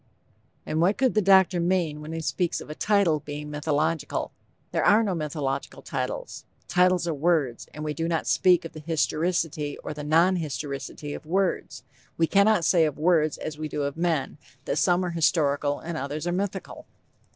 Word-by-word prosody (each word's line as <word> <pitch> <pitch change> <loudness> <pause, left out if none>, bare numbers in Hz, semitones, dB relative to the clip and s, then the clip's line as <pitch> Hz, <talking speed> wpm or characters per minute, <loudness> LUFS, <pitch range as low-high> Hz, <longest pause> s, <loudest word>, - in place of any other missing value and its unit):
_ - - -38 0.6
And 155 - -1
what 185 +4 +3
could 265 -2 +2
the 215 - +3
doctor 190 -2 +5
mean 170 -4 0
when 155 +1 -7
he 165 0 -4
speaks 175 +2 -1
of - - -9
a - - -3
title 195 -4 +2
being 150 0 -7
"mythological?" 150 +1 -1 0.4
There - - 0
are 215 +2 +5
no 200 -4 0
mythological 150 -4 -3
titles. - - -4 0.2
Titles 180 -1 +3
are 165 - 0
words, 150 -5 0
and 150 - -7
we 150 -1 -2
do 165 +1 -2
not 165 -1 -1
speak 180 -2 +3
of 165 - -8
the 155 - -8
historicity 160 -1 -1
or - - -4
the 150 0 -7
non 165 +5 +3
historicity 145 -1 -5
of - - -9
words. 185 -5 -1 0.3
We 165 - +3
cannot 200 0 +3
say 165 -1 +4
of 150 -2 -3
words 155 -1 +2
as 155 -1 -6
we 155 - -3
do 150 -1 -3
of 140 0 -2
men, 160 -4 -1 0.3
that - - -1
some 180 0 +2
are 175 - -2
historical 145 -3 +1
and 170 0 -6
others 145 +4 -4
are 175 - 0
mythical. 190 +1 -4
160 Hz, 190 wpm, -26 LUFS, 150-180 Hz, 0.6 s, doctor